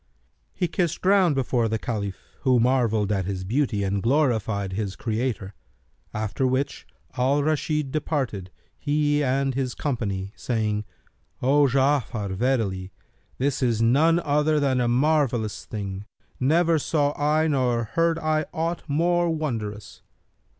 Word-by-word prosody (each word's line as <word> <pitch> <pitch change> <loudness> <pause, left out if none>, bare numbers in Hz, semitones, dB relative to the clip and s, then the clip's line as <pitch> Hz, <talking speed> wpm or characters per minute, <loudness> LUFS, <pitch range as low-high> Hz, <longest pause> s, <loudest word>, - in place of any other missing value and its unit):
He 180 - 0
kissed 170 -1 -1
ground 185 -5 +4
before 125 -3 +1
the 110 - 0
Caliph, 105 -4 -3 0.2
who 130 -3 +3
marvelled 115 -4 +2
at 95 -3 0
his 95 -1 -3
beauty 110 0 0
and 100 0 -1
glorified 110 -7 +1
his 100 -1 -3
Creator; 110 -4 -3 0.6
after 110 +4 -1
which 130 +2 -2 0.3
Al 140 +3 +2
Rashid 150 -2 0
departed, 135 - -2 0.3
he 145 0 +1
and 135 0 +1
his 130 -1 -2
company, 100 -8 -3
saying, 110 -3 -1 0.5
"O 140 +3 +4
Ja'afar, 130 -6 +1
verily, 100 -4 -1 0.5
this 140 +1 0
is 120 -4 +1
none 150 +9 +4
other 150 0 +2
than 135 -3 +1
a 120 - +1
marvellous 125 -4 +1
thing, 100 -2 -5 0.3
never 160 +4 +3
saw 145 -1 +1
I 155 +2 +2
nor 125 -5 +1
heard 165 +9 +1
I 155 -1 0
aught 165 +2 -2
more 175 +3 +2
wondrous." 110 -10 -4
130 Hz, 130 wpm, -25 LUFS, 110-150 Hz, 0.6 s, ground